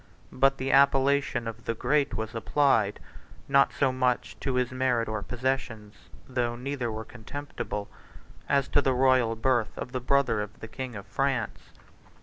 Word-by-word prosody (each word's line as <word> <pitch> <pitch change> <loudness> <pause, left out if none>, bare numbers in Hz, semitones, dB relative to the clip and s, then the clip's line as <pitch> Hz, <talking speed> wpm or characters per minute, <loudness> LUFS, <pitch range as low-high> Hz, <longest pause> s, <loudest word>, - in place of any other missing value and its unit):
But 135 +1 +3
the 135 +1 -2
appellation 140 -2 +3
of 115 0 -7
the 115 - -1
Great 135 0 +1
was 110 +2 -4
applied, 115 -3 +2 0.5
not 140 0 +4
so 135 -2 +1
much 130 -1 0
to 135 -2 -2
his 125 0 +1
merit 130 -2 +1
or 110 -1 -3
possessions, 120 -3 -3 0.3
(though 120 -2 -1
neither 125 -1 -3
were 110 0 -5
contemptible,) 120 -3 -6 0.6
as 140 -1 +2
to 145 - +4
the 135 -1 +2
royal 130 -3 +3
birth 120 -1 0
of 125 - -5
the 130 -1 -3
brother 130 -4 +2
of 105 0 -7
the 115 - -8
king 125 +1 -6
of 100 -1 -7
France. 135 -5 -1
125 Hz, 160 wpm, -28 LUFS, 115-135 Hz, 0.6 s, not